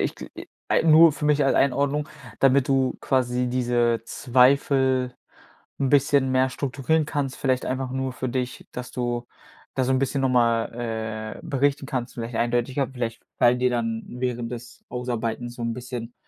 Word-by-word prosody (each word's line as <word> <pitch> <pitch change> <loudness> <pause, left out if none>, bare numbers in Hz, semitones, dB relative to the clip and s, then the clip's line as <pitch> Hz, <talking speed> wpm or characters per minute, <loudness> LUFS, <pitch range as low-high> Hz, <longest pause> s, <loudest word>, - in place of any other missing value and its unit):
ich - - -1
gl - - -9
i - - -9 0.2
ei - - +3
nur 160 0 +7
für 150 - -6
mich 150 -1 +3
als 135 - +3
Einordnung, 140 +2 +1 0.3
damit 135 0 +4
du 135 -1 +1
quasi 125 -1 0
diese 120 -2 +1
Zweifel 130 0 +2 0.6
'n 135 -2 0
bisschen 140 -2 +3
mehr 130 0 +3
strukturieren 140 +4 0
kannst, 140 -3 -2
vielleicht 130 -2 0
einfach 130 0 -2
nur 130 -1 -2
für 130 0 -4
dich, 125 0 -4
dass 125 0 -6
du 120 -1 -3 0.5
da 130 - +1
so 130 - +1
'n 130 - +3
bisschen 135 0 0
noch 130 - +3
mal, 115 -2 -1
äh, - - -12
berichten 140 0 0
kannst, 125 -3 -4
vielleicht 115 0 -6
eindeutiger 120 +3 0
vielleicht 120 -3 -5 0.2
fallen 120 +1 +4
dir 125 0 +3
dann 115 -2 -1
während 120 -1 -3
des 120 0 -9
Ausarbeitens 120 -1 -3
so 120 - -6
'n 115 - -1
bisschen 120 -1 -7
125 Hz, 175 wpm, -24 LUFS, 120-135 Hz, 0.6 s, nur